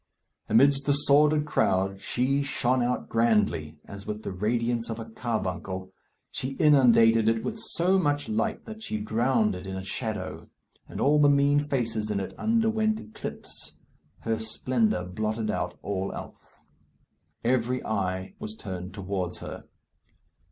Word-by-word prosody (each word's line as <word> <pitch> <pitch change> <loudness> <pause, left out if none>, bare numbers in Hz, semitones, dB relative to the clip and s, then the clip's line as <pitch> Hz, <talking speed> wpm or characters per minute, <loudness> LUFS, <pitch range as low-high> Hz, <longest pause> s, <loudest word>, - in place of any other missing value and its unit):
Amidst 140 0 +4
the 145 - +5
sordid 150 +1 +4
crowd 95 -8 +1
she 135 +6 +1
shone 130 -2 +1
out 125 +1 -1
grandly, 105 -9 +1
as 100 0 -10
with 105 0 -4
the - - -4
radiance 115 +4 -1
of 115 - -3
a 115 - -5
carbuncle. 95 -5 -4 0.4
She 130 +1 -3
inundated 115 -6 +5
it 115 0 0
with 220 +1 -4 0.2
so 185 +3 +3
much 145 -5 +1
light 110 0 -1
that 220 0 -9
she 220 - -3
drowned 110 0 +1
it 90 +1 -7
in 95 0 -4
shadow, 95 -6 -4 0.4
and - - -7
all 150 +2 +4
the 145 -1 +6
mean 140 0 +4
faces 115 -7 -1
in 105 -2 0
it 95 - -5
underwent 220 -1 +2
eclipse. 105 - -7 0.5
Her 110 -1 -1
splendour 110 -2 0
blotted 110 +4 -2
out - - -3
all 95 -1 -2
else. - - -11 0.8
Every 125 +1 +1
eye 95 -3 -2
was 110 0 -6
turned 95 -3 -7
towards 95 -2 -3
her. - - -8
115 Hz, 145 wpm, -27 LUFS, 100-140 Hz, 0.8 s, the